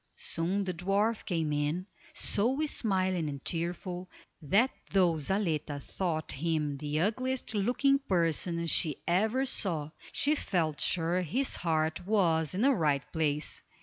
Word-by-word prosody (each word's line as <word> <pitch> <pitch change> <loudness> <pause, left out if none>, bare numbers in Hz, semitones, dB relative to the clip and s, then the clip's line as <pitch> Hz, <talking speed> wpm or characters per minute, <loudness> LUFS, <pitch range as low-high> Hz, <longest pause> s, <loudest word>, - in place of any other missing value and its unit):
Soon 185 +5 -1
the 185 -1 -2
dwarf 200 +6 0
came 160 -5 -1
in, 150 +5 -1 0.3
so 260 +9 +1
smiling 185 - 0
and 140 -1 -7
cheerful, 175 +2 -3 0.3
that 200 - +3 0.2
though 180 -4 +3
Zaletta 155 -4 0
thought 160 +1 -2
him 150 -1 -1
the 150 +2 -2
ugliest 255 +6 0
looking 250 +7 +2
person 170 - 0
she 155 -2 +2
ever 220 +9 +2
saw, 165 - 0 0.2
she 290 - +3
felt 165 - -1
sure 175 +1 +1
his 245 - -1
heart 160 +1 0
was 165 -7 +2
in 200 - 0
the 275 - +6
right 150 - +1
place. 150 -2 -1
175 Hz, 135 wpm, -30 LUFS, 155-205 Hz, 0.3 s, the